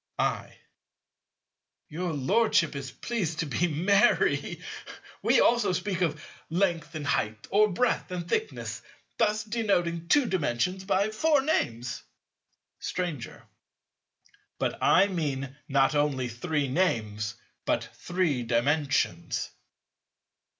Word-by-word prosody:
I. - - -1 1.3
Your 175 +3 -3
Lordship 160 - +2
is 135 -1 -5
pleased 170 - -3
to 165 - -1
be 150 +5 0
merry. 195 +8 +2 0.6
We - - +4
also 235 -6 +3
speak 190 -1 -2
of 155 -4 -1 0.2
length 170 -2 0
and 150 -2 -4
height, 110 -6 -1
or 210 +2 +5
breadth 245 +6 0
and 175 -2 -4
thickness, 440 - -2 0.4
thus 215 +1 +2
denoting 185 -7 0
Two 290 - +4
Dimensions 180 - -1
by 200 +2 +1
four 295 +6 +3
names. 125 - -1 0.8
Stranger. 170 -9 -4 1.1
But - - -2
I - - +6
mean 140 -8 -3
not 135 +1 +3
only 145 -4 +1
three 140 +5 -1
names, 110 - 0 0.3
but - - +1
Three 175 -8 -1
Dimensions. 140 +5 0
170 Hz, 110 wpm, -28 LUFS, 140-195 Hz, 1.3 s, I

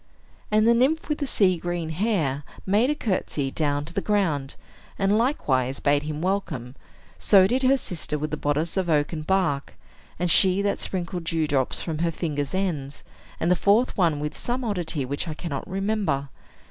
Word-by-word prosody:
And 215 +1 +3
the 235 - +6
nymph 275 +8 +1
with 300 - -1
the 285 - -2
sea 185 -7 +3
green 175 -1 -3
hair 160 - 0 0.2
made 210 +7 +3
a 300 - +1
courtesy 170 - -2
down 145 -1 0
to 170 - -9
the 195 - -1
ground, 165 -11 0 0.4
and 195 +1 +2
likewise 135 - +1
bade 145 0 +2
him 150 +1 -5
welcome; 165 -10 -2 0.4
so 195 -3 +6
did 250 +7 +1
her 265 +1 +4
sister 165 - -3
with 155 +1 -4
the - - 0
bodice 150 +4 -1
of 185 -2 0
oaken 155 +1 +1
bark, 155 -5 0 0.4
and 175 0 +1
she 190 +3 +5
that 200 - 0
sprinkled 175 -2 -4
dew 165 -1 0
drops 135 -3 0
from 160 -3 -4
her 170 0 +1
fingers' 150 -1 -3
ends, 155 -8 -3 0.4
and 170 - +1
the - - +5
fourth 210 +7 +2
one 165 -6 +2
with 150 +1 -4
some 250 +2 -2
oddity 175 - -2
which 140 +5 -2
I 155 - -4
cannot 155 -2 -5
remember. 195 -8 -1
170 Hz, 185 wpm, -25 LUFS, 150-200 Hz, 0.4 s, the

